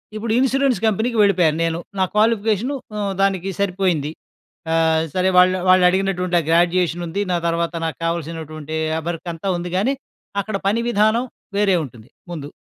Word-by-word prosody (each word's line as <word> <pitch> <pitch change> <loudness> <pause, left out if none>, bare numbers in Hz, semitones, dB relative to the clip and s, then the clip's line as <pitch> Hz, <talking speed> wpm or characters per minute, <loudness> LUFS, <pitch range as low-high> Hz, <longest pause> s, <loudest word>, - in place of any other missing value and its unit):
ఇప్పుడు 220 +1 -3
ఇన్సూరెన్స్ 270 0 +2
కంపెనీకి 220 +3 0
వెళ్ళిపోయాను 180 -6 +3
నేను. 165 0 -1 0.2
నా - - +4
క్వాలిఫికేషన్ 220 +3 +2 0.2
హ్మ్. 205 -2 -2
దానికి 195 -1 +1
సరిపోయింది. 180 -6 0 0.6
ఆహ్, 160 -1 +3
సరే 185 0 +2
వాళ్ళ 180 0 +6 0.2
వాళ్ళు 185 0 +6
అడిగినటువంటి 180 -1 0
ఆహ్, 165 - -4
గ్రాడ్యుయేషన్ 175 0 +2
ఉంది. 185 +5 -2
నా 175 - +2
తర్వాత 170 +1 -1
నాకు 160 - -3
కావాల్సినటువంటి 160 -2 -4 0.2
ఆహ్, 160 - -4
వర్క్ 170 0 -5
అంతా 165 +4 -4
ఉంది. 175 0 -5
గానీ, 250 +9 +1 0.5
అక్కడ 215 0 -5
పని 220 +4 +2
విధానం 220 +2 +2 0.3
వేరే 200 -2 +3
ఉంటుంది 120 -2 -14 0.2
ముందు. 150 -4 -6
185 Hz, 155 wpm, -20 LUFS, 165-210 Hz, 0.6 s, వాళ్ళ